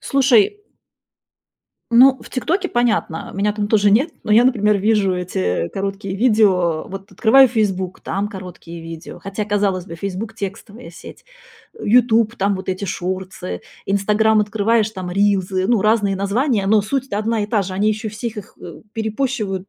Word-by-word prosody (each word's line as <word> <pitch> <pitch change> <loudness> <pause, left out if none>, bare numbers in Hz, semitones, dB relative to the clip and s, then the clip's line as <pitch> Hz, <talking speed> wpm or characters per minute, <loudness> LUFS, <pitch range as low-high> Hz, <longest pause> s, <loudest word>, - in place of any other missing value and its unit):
Слушай 270 - +3 1.3
Ну, 260 +3 +6
в - - -13
"Тиктоке" 355 +9 -1
понятно, 225 - -1
меня 205 +2 0
там 205 -1 -3
тоже 205 -2 +3
нет, 270 +10 +3
но 215 - 0
я, 225 +3 +7
например, 210 -5 +3
вижу 200 -2 +1
эти 90 - -2
короткие 195 0 -4
видео, 195 -8 +2
вот 195 +1 -9
открываю 250 +7 +6
"Фейсбук", 190 -6 -2
там 200 +1 -3
короткие 180 -4 -10
видео, 165 0 -9
хотя, 195 +2 -4
казалось 200 -3 0
бы, 170 - -8
"Фейсбук"- 200 +5 -5
текстовая 205 0 -8
сеть. 170 - -13 0.6
"Ютуб"- 230 0 +3
там 195 0 0
вот 190 - -8
эти 185 +2 -2
шортсы, 185 - -5 0.3
"Инстаграм" 210 +2 +2
открываешь- 215 +1 +1
там 185 -4 -6
рилсы, 190 -1 +1
ну, 235 -3 +3
разные 210 -2 +2
названия, 205 +2 0
но 210 +1 +4
суть-то 260 -1 -2
одна 220 0 -1
и - - -6
та 210 -1 +1
же, 185 - -6
они 195 +3 0
ещё 215 +1 -2
всех 220 +2 -6
их, 210 - -9
э, - - -10
перепощивают. 220 -4 -3
205 Hz, 160 wpm, -19 LUFS, 190-225 Hz, 1.3 s, я